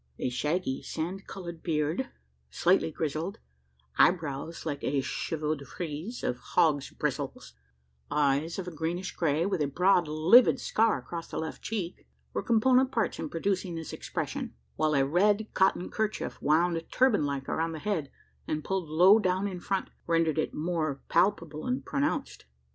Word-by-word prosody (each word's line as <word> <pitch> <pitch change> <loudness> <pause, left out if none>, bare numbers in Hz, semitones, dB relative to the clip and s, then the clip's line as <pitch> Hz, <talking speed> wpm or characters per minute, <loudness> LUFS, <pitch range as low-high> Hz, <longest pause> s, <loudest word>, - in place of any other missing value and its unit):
A - - -1
shaggy 150 +2 -1
sand 180 +5 -4
coloured 170 -4 -7
beard, 160 - -1 0.4
slightly 180 -1 +3
grizzled; 160 +5 -3 0.6
eyebrows 160 -2 +1
like 145 -3 -3
a 140 0 +1
chevaux 155 +3 -2
de 140 -2 -7
frise 165 - -6
of 125 - -1
hogs' 145 -4 +2
bristles; - - -4 0.6
eyes 145 +2 +1
of 190 -2 -4
a - - -4
greenish 170 +4 -3
grey, 160 0 +1
with 190 -4 0
a 145 - +2
broad 180 +3 +3
livid 160 +11 +6
scar 225 0 +2
across 170 -1 -6
the - - -6
left 160 -1 -4
cheek, 205 -5 -4 0.3
were - - -1
component 255 +3 +3
parts 230 -4 0
in - - -3
producing 185 0 -1
this 160 -1 -6
expression; - - -4 0.2
while 155 -1 +1
a 135 -1 +4
red 205 +8 +3
cotton 190 -1 +2
kerchief, 215 -1 -2
wound, 165 +2 +2
turban 255 - +3
like, 140 -2 -2
around 165 0 -1
the - - -5
head, 160 -5 -2 0.4
and, 155 -1 -2
pulled 190 -3 -2
low 180 +7 +7
down 190 0 +1
in 185 -3 -5
front, 195 +1 -2 0.2
rendered 165 -2 +2
it - - 0
more 155 -3 -2
palpable 165 -5 +1
and 250 +1 -1
pronounced. 285 - -2
170 Hz, 160 wpm, -29 LUFS, 155-195 Hz, 0.6 s, low